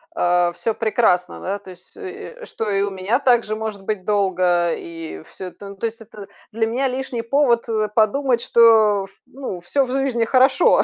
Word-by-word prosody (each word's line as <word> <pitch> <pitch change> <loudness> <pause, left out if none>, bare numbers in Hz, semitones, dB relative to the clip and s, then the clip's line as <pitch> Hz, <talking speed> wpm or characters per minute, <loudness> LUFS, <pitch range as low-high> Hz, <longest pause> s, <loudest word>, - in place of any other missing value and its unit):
э, 175 0 +2
всё 225 +5 -2
прекрасно, 215 -5 +1
да, 195 +2 -3
то 195 -2 -13
есть, 180 - -15
э, 415 +2 -8
э, - - -8
что 220 - -4
и 200 -1 +1
у 200 - -2
меня 190 +5 0
также 240 -5 +2
может 215 -2 -5
быть 195 -2 -3
долго, 185 -4 +2
и 165 - -8
всё 185 - -9
это. 200 +2 -11
Ну, 200 - -10
то 215 +4 -2
есть, 230 +1 -8
это 210 -2 -11 0.2
для 225 +1 0
меня 255 +4 0
лишний 255 -2 -4
повод, 240 -1 +2
э, 215 -1 0
подумать, 240 +3 +2
что, 220 -5 +5
ф - - -17 0.2
ну, 255 -9 -7
всё 275 +11 +1
в 255 - -5
жизни 260 -3 0
хорошо, 265 +7 +4
220 Hz, 200 wpm, -21 LUFS, 195-245 Hz, 0.2 s, что